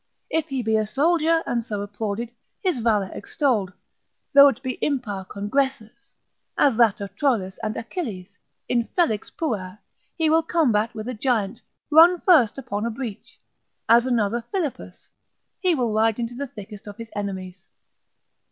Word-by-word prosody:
If 320 -1 0
he 265 -2 -2
be 220 0 +2
a 215 -1 0
soldier, 325 +6 +2
and 235 -1 -1
so 210 -3 -4
applauded, 205 +3 -4 0.3
his 360 -9 +1
valour 215 -4 +1
extolled, 215 -6 0 0.6
though 280 0 +9
it 275 0 -1
be 255 -1 -4
impar 220 -9 -2
congressus, 220 +3 -3 0.4
as 275 -5 +4
that 225 -3 +4
of 200 -1 -7
Troilus 215 -8 0
and 215 -1 -3
Achilles, 230 - -5 0.4
Infelix 235 - 0
puer, 205 - -4 0.4
he 325 -2 +2
will 320 +1 +4
combat 245 -11 +1
with 215 +1 -6
a 255 - -3
giant, 225 -3 -1 0.3
run 335 +3 +7
first 295 - +4
upon 225 -6 -4
a 235 - 0
breach, 230 -3 -7 0.5
as 235 +2 +5
another 235 -1 0
Philippus, 345 -9 -4 0.5
he 365 -3 +2
will 240 -6 0
ride 220 0 +2
into 235 0 -3
the 280 +3 -4
thickest 210 -3 -11
of 205 0 -9
his 230 -1 -8
enemies. 190 -2 -5
230 Hz, 150 wpm, -23 LUFS, 210-280 Hz, 0.6 s, though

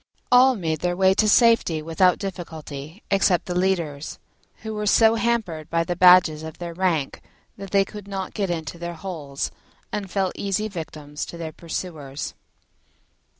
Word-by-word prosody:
All 255 +1 +7
made 160 -6 -2
their 175 +1 -1
way 190 0 +5
to 215 +2 +2
safety 230 -8 +4
without 165 +4 +2
difficulty 160 -3 -7
except 195 -3 +3
the 180 - -3
leaders, 175 -5 -1 0.5
who 220 0 -4
were 210 0 -3
so 225 +2 +5
hampered 225 -9 -1
by 165 0 +1
the 175 +1 -3
badges 180 -3 +6
of 160 -1 -8
their 170 -1 -6
rank 165 -6 -1 0.3
that 195 0 -8
they 195 0 +3
could 205 0 -10
not 195 -2 -5
get 200 -3 -1
into 165 -1 -4
their 170 0 -5
holes, 160 -6 -5 0.4
and 200 -2 -4
fell 190 -1 0
easy 200 +2 -1
victims 155 -6 -7
to 170 - -8
their 165 -1 -5
pursuers. 155 -4 -6
180 Hz, 160 wpm, -23 LUFS, 160-195 Hz, 0.5 s, All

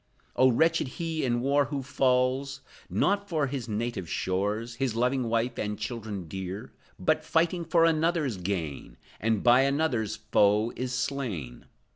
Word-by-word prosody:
Oh, 130 - +5
wretched 160 +4 +2
he 165 -2 -2
in 120 -2 +1
war 140 +2 +3
who 140 -1 -4
falls, 135 +1 +1 0.3
Not 200 0 +1
for 155 -5 +1
his 130 -4 -4
native 105 -5 -3
shores, 105 +5 -1
His 130 -3 -1
loving 125 0 +1
wife 115 +2 0
and 105 0 -2
children 105 -4 -5
dear, 95 -4 -6 0.2
But, - - +1
fighting 170 +1 +1
for 165 0 +4
another's 160 - +1
gain, 85 -6 -4 0.2
And 110 -2 0
by 120 +1 +6
another's 135 -6 0
foe 105 0 +2
is 125 0 -3
slain! 125 - -3
125 Hz, 145 wpm, -28 LUFS, 105-140 Hz, 0.3 s, by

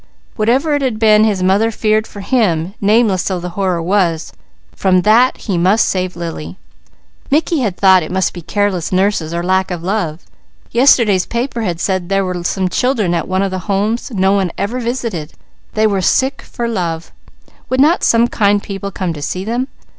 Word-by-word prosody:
Whatever 255 +8 +1
it 290 - +1
had 255 -5 -1
been 215 -1 +5
his 200 -4 0
mother 195 +4 +3
had 225 - -5
feared 215 0 +1
for 205 - -10
him, 195 -7 0
nameless 210 -2 +3
though 185 -2 -1
the 180 +1 -5
horror 180 -2 -1
was, 175 -3 0 0.4
from 185 -2 +2
that 235 +5 +4
he 190 -6 -2
must 190 +6 +3
save 185 -1 -2
Lily. 95 - -6 0.7
Mickey 310 +2 +1
had 210 -8 -2
thought 190 -2 +5
it 155 - -6
must 190 -1 0
be 175 - -8
careless 200 -1 -1
nurses 185 -4 0
or 170 0 -2
lack 190 +1 +1
of 175 -2 -5
love. 180 -4 -2 0.5
Yesterday's 235 -7 +4
papers 235 -1 -3
had 170 -3 -2
said 185 -1 -1
there 195 0 +1
were 180 -1 -4
some 185 +1 -1
children 215 -2 0
at 170 - -2
one 185 +1 0
of 195 - -2
the 185 +2 -6
Homes, 210 +6 0
no 190 -5 +1
one 195 -2 +1
ever 235 +5 -2
visited; 230 -10 -4 0.4
they 215 0 +2
were 200 -3 +1
sick 265 +9 +1
for 235 -1 -5
love; 170 -7 -3 0.6
would 255 - 0
not 315 +6 +3
some 230 +1 +4
kind 205 -3 +1
people 200 0 -5
come 185 -3 -3
to 150 - -8
see 185 +6 -3
them? 240 +4 -2
195 Hz, 190 wpm, -16 LUFS, 180-225 Hz, 0.7 s, been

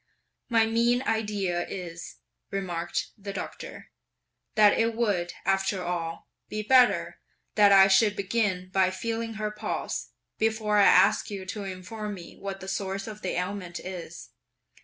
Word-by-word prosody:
"My 225 -2 +4
mean 235 +3 +2
idea 205 -6 -1
is," 175 -3 -7 0.3
remarked 175 -3 -3
the 200 0 -6
Doctor, 190 - -7 0.6
"that 210 -1 +6
it 230 0 +1
would, 200 -7 0
after 195 0 +1
all, 170 -2 -4 0.2
be 215 0 -3
better 250 +2 +4 0.3
that 205 -1 +6
I 195 -1 +8
should 205 +2 +4
begin 195 -3 -1
by 190 -1 +3
feeling 225 +4 -3
her 215 0 -2
pulse, 210 - -4 0.3
before 220 -1 +1
I 200 - +7
ask 215 +2 +5
you 195 -2 -6
to 200 +2 -5
inform 205 +3 -6
me 175 -3 -11
what 195 -1 -6
the 190 - -8
source 195 0 -3
of 215 -1 -8
the 185 - -2
ailment 180 -1 -4
is. 175 -2 -8
200 Hz, 145 wpm, -27 LUFS, 185-215 Hz, 0.6 s, I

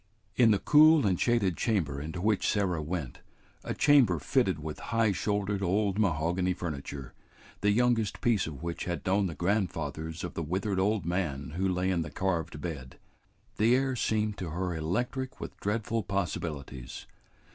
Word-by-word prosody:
In 120 -3 +5
the 105 - +4
cool 155 +3 +6
and 95 -3 +1
shaded 115 -7 +2
chamber 80 - 0
into 80 +3 -5
which 105 0 +1
Sarah 95 -6 0
went, 80 -4 -4 0.4
a - - -3
chamber 135 - +5
fitted 95 - +1
with 75 0 -6
high 115 -1 +3
shouldered 100 +1 -1
old 100 +2 +1
mahogany 90 0 +1
furniture, 70 -5 -6 0.5
the 105 - +2
youngest 115 -1 +2
piece 110 -8 +2
of 80 0 -8
which 85 0 -4
had 85 -1 -4
known 95 +1 +2
the 85 - -6
grandfathers 80 -4 -2
of 90 - -5
the - - -3
withered 95 +5 -1
old 100 -2 +1
man 75 -7 -2
who 95 +4 0
lay 90 +1 0
in 85 -2 +1
the 75 - -4
carved 85 -2 -2
bed, 70 -5 -6 0.6
the 115 +3 +4
air 135 0 +1
seemed 110 -2 0
to 90 - -4
her 90 +3 -2
electric 125 +11 -2
with - - -7
dreadful 110 +2 -1
possibilities. 80 - -4
95 Hz, 165 wpm, -29 LUFS, 80-105 Hz, 0.6 s, cool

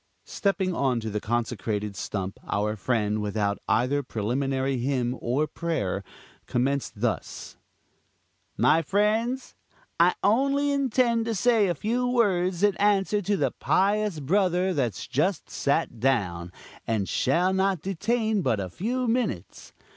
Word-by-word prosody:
Stepping 190 -2 0
on 130 -6 +1
to 110 -1 -5
the 105 - -1
consecrated 110 -2 -2
stump, 95 -1 -4
our 105 +1 0
friend, 105 -1 0
without 105 -1 -1
either 135 +4 +2
preliminary 130 +3 -1
hymn 125 -1 0
or 130 +6 +1
prayer, 125 - -2 0.4
commenced 130 -3 -1
thus: 120 -3 -3 1.0
"My 160 - +4
friends, 220 +8 0 0.5
I 175 +2 +5
only 275 +6 +2
intend 250 -4 +1
to 225 -1 -1
say 225 -1 +3
a 175 - 0
few 240 - -1
words 190 -7 +1
in 205 -2 +4
answer 205 0 +2
to 200 +1 0
the - - +1
pious 205 -2 +1
brother 185 +4 +1
that's 125 - -2
just 170 +8 -1
sat 140 -4 0
down, 95 -9 0 0.4
and 110 -4 0
shall 180 +3 +1
not 190 -3 +1
detain 215 +3 0
but 120 - +1
a 95 -2 -4
few 245 - -2
minutes. 225 - -2
165 Hz, 130 wpm, -26 LUFS, -, 1.0 s, I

